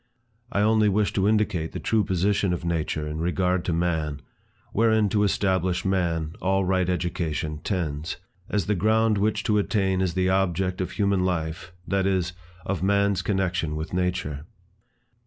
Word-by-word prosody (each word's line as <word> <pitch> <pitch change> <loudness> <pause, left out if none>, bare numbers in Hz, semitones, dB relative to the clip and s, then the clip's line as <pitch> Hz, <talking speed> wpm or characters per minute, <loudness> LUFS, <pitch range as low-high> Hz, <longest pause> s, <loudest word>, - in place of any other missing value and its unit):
I 100 - +1
only 110 0 +4
wish 105 +1 +1
to 100 0 +2
indicate 105 -7 +1
the - - -4
true 110 -2 +1
position 95 0 +1
of 85 - -4
nature 80 -2 -1
in 75 +1 -4
regard 90 +1 0
to - - 0
man, 80 -4 -1 0.5
wherein 110 -1 +3
to 105 +1 +1
establish 95 -3 +1
man, 85 -4 0
all 95 0 +1
right 95 -1 +1
education 80 -4 -2
tends; 80 -3 -3 0.3
as 105 -4 0
the 105 - +1
ground 110 +2 +2
which 105 +1 +1
to 105 -1 +2
attain 95 -3 +1
is 90 -3 -1
the 95 0 +2
object 95 -1 +1
of 90 -1 -3
human 100 -2 +1
life, 85 0 -2 0.2
that 95 0 +1
is, 90 -2 0 0.3
of 100 -4 -2
man's 100 0 +2
connection 90 -5 -1
with 80 +3 -5
nature. 90 -5 -2
95 Hz, 160 wpm, -25 LUFS, 85-100 Hz, 0.5 s, only